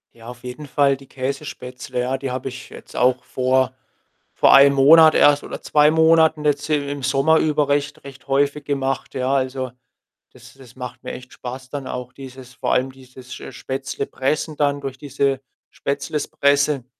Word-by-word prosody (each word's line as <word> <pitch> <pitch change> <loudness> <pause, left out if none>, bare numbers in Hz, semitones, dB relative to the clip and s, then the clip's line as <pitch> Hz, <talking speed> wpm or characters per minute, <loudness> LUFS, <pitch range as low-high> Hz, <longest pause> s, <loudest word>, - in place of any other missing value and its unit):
Ja, 115 0 -14
auf 125 0 -10
jeden 125 +4 -8
Fall 140 0 +2
die 135 0 -16
Käsespätzle, 130 -2 -5
ja. 130 +2 -1
Die 135 -1 -5
habe 130 +1 -4
ich 125 0 -10
jetzt - - -13
auch 125 0 +2
vor 130 0 0 0.7
vor - - +5
einem 140 0 +7
Monat 155 +3 +7
erst 145 0 +4
oder - - -8
2 150 0 +4
Monaten 160 -1 +4
jetzt 145 0 0
i 155 - +2 0.2
im 145 -1 -5
Sommer 135 +4 +3
über 150 -2 +1
recht 145 +1 -1
recht 135 -2 -12
häufig 140 +1 0
gemacht, 135 -2 -2
ja? 130 0 -1
Also, 130 -1 -1 0.6
das - - -16
das 130 -3 -17
macht 125 -1 -8
mir - - -5
echt 130 0 -11
Spaß 130 +1 -8
dann 140 -2 -5
auch 125 0 -6
dieses 130 -2 -11
vor - - -3
allem 130 +1 +1
dieses 130 -1 -13
sch - - -10
äh, - - -8
Spätzle-Pressen 135 +3 -3
dann 145 -1 +1
durch 135 -1 -6
diese 140 -1 -1 0.3
Spätzle-Presse. 140 -1 0
135 Hz, 175 wpm, -21 LUFS, 130-145 Hz, 0.7 s, einem